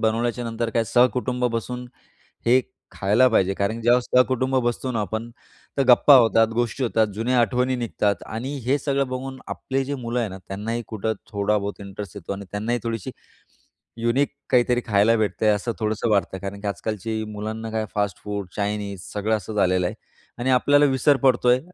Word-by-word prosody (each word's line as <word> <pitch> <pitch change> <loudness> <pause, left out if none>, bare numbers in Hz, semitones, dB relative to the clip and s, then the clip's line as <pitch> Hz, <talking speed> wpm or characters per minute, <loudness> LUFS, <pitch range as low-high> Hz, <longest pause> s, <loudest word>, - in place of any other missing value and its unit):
बनवल्याच्यानंतर 115 0 -1
काय 115 0 +1
सहकुटुंब 125 +1 +2
बसून 125 +2 -4 0.6
हे 125 +2 +6 0.3
खायला 105 +6 +3
पाहिजे 95 -4 +2
कारण 100 +3 -1
की 115 - -8
ज्यावेळेस 120 +1 +4
सहकुटुंब 130 +1 +3
बसतो 120 +2 -1
ना, 115 - -1
आपण 110 +4 -4 0.5
तर - - +4
गप्पा 130 +3 +8
होतात, 115 -2 +5
गोष्टी 120 +2 -1
होतात, 110 -2 +2
जुन्या 120 +3 +1
आठवणी 125 +3 +1
निघतात 105 -4 -1
आणि 125 +6 -4
हे 135 - +3
सगळं 140 -1 0
बघून 130 +1 -5
आपले 135 0 -2
जे 140 +2 -3
मुलं 120 -2 -3
आहे 110 - -1
ना, 95 - -8
त्यांनाही 110 +4 -3
कुठं 110 0 -2 0.2
थोडा 100 +1 +1
बहुत 100 0 -5
इंटरेस्ट 100 0 -8
येतो 100 0 -5
आणि 100 0 -6
त्यांनाही 110 +4 -1
थोडीशी 115 -4 -3 0.9
युनिक 120 +5 +2 0.2
काहीतरी 125 -1 +3
खायला 105 +2 +4
भेटतंय, 110 0 0
असं 105 +3 0
थोडंसं 110 +1 -1
वाटतंय. 100 -2 +1
कारण 100 0 -6
की 105 - -6
आजकालची 110 +3 -3
मुलांना 110 +2 -5
काय 110 0 -1
फास्ट 100 -1 -1
फूड, 100 -2 -4
चाइनीज 100 -2 -2
सगळं 105 +2 0
असं 105 +1 -7
झालेलं 90 -3 +2
आहे - - -3 0.4
आणि 125 +2 0
आपल्याला 145 +3 +4
विसर 135 +1 +3
पडतोय, 125 -1 +3
115 Hz, 175 wpm, -23 LUFS, 105-125 Hz, 0.9 s, गप्पा